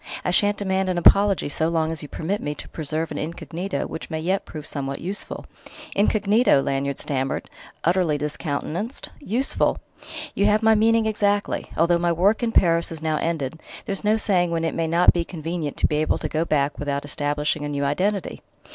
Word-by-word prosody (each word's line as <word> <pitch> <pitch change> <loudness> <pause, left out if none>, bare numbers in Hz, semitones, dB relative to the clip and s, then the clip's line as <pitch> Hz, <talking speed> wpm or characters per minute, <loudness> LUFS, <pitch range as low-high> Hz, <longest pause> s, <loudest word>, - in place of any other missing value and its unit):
I 180 - +1
shan't 205 +3 +3
demand 190 -1 0
an 180 - 0
apology 195 +1 +5
so 160 +2 0
long 160 -1 0
as 160 - -4
you 145 - -8
permit 190 +6 -2
me 150 - -3
to - - -8
preserve 155 +1 -3
an 150 - -3
incognito 170 +1 -4
which - - -7
may 160 -2 -3
yet 185 +5 -1
prove 155 -2 -8
somewhat 140 -2 -3
useful." 195 +4 -5 0.5
"Incognito!" 210 - +3
Lanyard 135 0 -1
stammered, 135 -1 -2 0.4
utterly 170 -3 +2
discountenanced. 155 - -4
"Useful!" 260 0 0 0.6
"You 200 - +2
have 210 +1 +3
my 220 0 +6
meaning 225 +1 +3
exactly; 205 -1 0
although 170 +1 +3
my 175 0 +2
work 195 +7 +2
in 235 -1 0
Paris 170 -5 +3
is 160 -1 -7
now 155 -1 +1
ended, 160 -2 -2 0.2
there's 200 -2 -2
no 210 +1 +3
saying 185 -5 +2
when 165 -1 -1
it 165 - -1
may 165 -1 -1
not 170 +2 +5
be 175 - 0
convenient 165 -3 -4
to - - +2
be 150 - -1
able 155 - +1
to - - -3
go 160 +1 -1
back 145 -2 0
without 140 -1 -2
establishing 145 +1 -1
a 145 - -3
new 140 -1 -1
identity." 190 +7 -1
170 Hz, 190 wpm, -23 LUFS, 150-200 Hz, 0.6 s, my